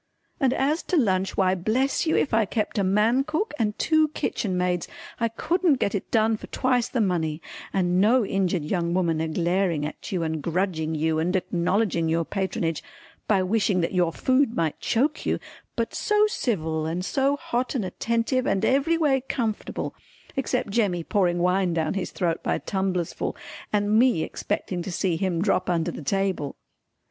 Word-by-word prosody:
And 265 -4 +3
as 295 +5 +1
to 360 - +2
lunch 190 -7 +1
why 185 -1 +3
bless 240 - 0
you 315 - +3
if 275 - 0
I 220 -1 +4
kept 215 +1 -2
a - - +2
man 215 +7 +3
cook 315 +8 -2
and 210 -2 0
two 315 -1 +3
kitchen 205 -9 -2
maids 180 -1 0 0.3
I 230 - +2
couldn't 320 +5 +1
got 200 - 0
it 200 - -3
done 220 -1 +2
for - - -10
twice 250 -2 +1
the 250 - -1
money, 165 -7 0 0.3
and 180 -1 +2
no 230 +3 +4
injured 185 -4 0
young 170 +1 -1
woman 165 -4 +1
a 160 - -1
glaring 170 -1 0
at 150 - -7
you 180 -4 0
and 160 -1 -2
grudging 165 -2 -1
you 155 +1 +1
and 175 +4 0
acknowledging 175 -1 0
your 165 0 +1
patronage 185 -4 -2 0.5
by 195 -3 +3
wishing 195 -1 +1
that 165 - -1
your 175 -2 +2
food 260 - +1
might 160 -3 -1
choke 285 +7 0
you, - - 0 0.4
but 230 -1 -2
so 420 0 +3
civil 160 - -1
and 175 +3 -2
so 275 +4 +1
hot 250 0 -2
and 225 -7 0
attentive 235 +6 0
and 195 - +1
every 280 +5 +2
way 285 -5 +2
comfortable 225 -5 -2 0.4
except 255 -4 -1
Jemmy 200 -6 +1
pouring 180 -1 +1
wine 180 0 +1
down 160 -2 0
his 195 -2 -2
throat 170 -3 -1
by - - 0
tumblers 190 -3 -2
full - - -3 0.4
and 210 +1 +3
me 245 -10 +3
expecting 180 -2 -3
to 175 - -5
see 175 -1 0
him 175 0 0
drop 185 -3 +1
under 170 -1 0
the - - -8
table. 185 -2 -1
195 Hz, 180 wpm, -25 LUFS, 175-235 Hz, 0.5 s, I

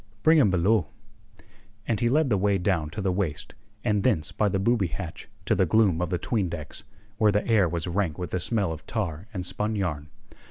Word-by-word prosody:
"Bring 160 0 +6
him 125 - +5
below." 95 +5 +2 1.0
And 110 -4 0
he 120 - +2
led 145 0 +2
the 105 - +3
way 100 0 +2
down 90 -5 0
to 105 - -5
the 95 -1 +1
waist, 90 -6 -3 0.3
and 105 -3 +1
thence 85 - +1
by 105 - +1
the 95 - 0
booby 100 0 +2
hatch 85 0 -7 0.2
to - - +2
the - - +2
gloom 100 -7 +3
of 90 - -1
the 90 - 0
'tween 100 +1 -1
decks, 80 -3 -7 0.4
where 105 -1 +5
the 105 0 0
air 105 -6 +4
was 85 -1 -3
rank 90 -3 -1
with 90 - -5
the 90 - -1
smell 100 -1 0
of 80 - -8
tar 95 -5 -3
and 90 -5 -4
spun 105 +5 -2
yarn. 80 -7 -2
95 Hz, 215 wpm, -26 LUFS, 85-110 Hz, 1.0 s, Bring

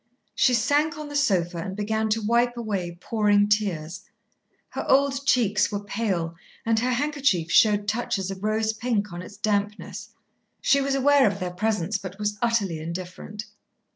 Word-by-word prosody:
She 250 - +3
sank 295 +7 +1
on 300 -1 -7
the 290 - -7
sofa 180 -11 +1
and 190 +2 -5
began 220 +1 -1
to 220 +1 0
wipe 240 +2 +2
away 195 -7 -3
pouring 205 -1 +2
tears. 190 -6 -1 0.7
Her - - -4
old 275 0 +2
cheeks 210 -6 +3
were 205 0 -3
pale 195 -6 -2 0.3
and 225 -1 +2
her 250 +2 0
handkerchief 260 - 0
showed 205 -2 +4
touches 205 -3 -1
of 190 0 -8
rose 220 +1 +1
pink 215 -4 -2
on 175 - -6
its 190 +3 -11
dampness. 205 0 -2 0.5
She 275 +1 +3
was 275 0 0
aware 280 -1 +5
of 200 -1 -2
their 180 -2 -3
presence, 205 0 -1
but 190 0 -8
was 210 0 -2
utterly 215 -8 0
indifferent. 180 +5 -7
210 Hz, 165 wpm, -25 LUFS, 195-240 Hz, 0.7 s, aware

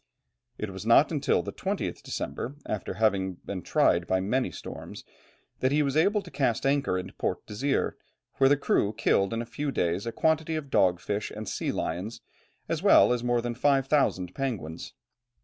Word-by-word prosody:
It - - -4
was - - -7
not - - +5
until - - +1
the - - -6
20th - - -3
December, 135 - -4
after 105 - -4
having 95 -4 +1
been 95 -2 -4
tried 85 +1 +2
by 95 - +2
many 110 +5 0
storms, 70 - -8 0.6
that 130 - +1
he 150 +1 +3
was 140 -1 -1
able 200 +6 +3
to 175 - -12
cast 130 -4 0
anchor 135 -8 +2
in 90 - -5
Port - - -2
Desire, 135 +7 -1 0.4
where 135 0 +5
the 145 - +4
crew 105 -6 +1
killed 100 -2 +2
in 115 +1 -2
a - - -9
few 140 +5 -3
days 90 0 -1
a - - -1
quantity 160 +4 +1
of 145 -3 -5
dog 90 -2 +3
fish 100 +3 -3
and 105 0 -7
sea - - -2
lions, 100 +7 -4 0.5
as - - -2
well - - +6
as 120 -1 -2
more 120 -1 +1
than 120 0 -2
five 135 +2 +2
thousand 95 - +1
penguins. 95 - -4
120 Hz, 185 wpm, -28 LUFS, 95-140 Hz, 0.6 s, well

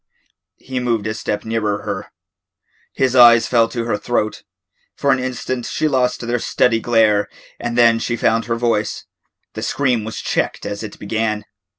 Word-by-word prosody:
He 130 -1 -5
moved 115 -4 -1
a 110 - -1
step 105 -1 -3
nearer 105 -2 -1
her. - - -4 0.9
His 130 -1 +1
eyes 120 -2 +8
fell 115 -2 +3
to 115 -2 -3
her 115 -3 0
throat. 110 -2 -1 0.5
For 140 - +1
an 130 - +2
instant 130 -1 -3
she 155 - 0
lost 125 -3 +1
their 120 +1 -1
steady 115 0 +2
glare 110 -3 +2 0.3
and 120 0 -3
then 115 -1 +5
she 120 - -2
found 115 0 +1
her 115 0 -1
voice. 115 -3 -1 0.5
The - - -6
scream 130 -5 0
was 110 +1 -6
checked - - -2
as 100 0 -4
it 110 -2 -8
began. 105 0 -2
115 Hz, 170 wpm, -19 LUFS, 110-125 Hz, 0.9 s, eyes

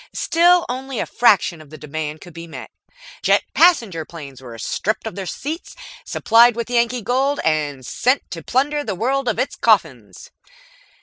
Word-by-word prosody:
Still 350 +1 +3
only 260 +1 -5
a - - -1
fraction 195 -8 +2
of 155 - -16
the 155 - -11
demand 150 +1 -6
could 175 -2 -13
be 170 +1 -9
met. 160 - -10 0.5
Jet - - +3
passenger 230 - +3
planes 145 -6 -11
were 120 -3 -10
stripped 215 - -2
of 220 - -4
their 195 -2 -6
seats, 310 - -6 0.3
supplied 230 +1 +4
with 235 +1 -4
Yankee 235 0 +1
gold, 270 +6 0
and 145 -4 -1
sent 255 - 0
to 165 - -6
plunder 290 - 0
the 195 - -3
world 260 +6 -1
of 230 - 0
its 255 +3 -2
coffins. 135 - 0
220 Hz, 170 wpm, -20 LUFS, 155-260 Hz, 0.5 s, supplied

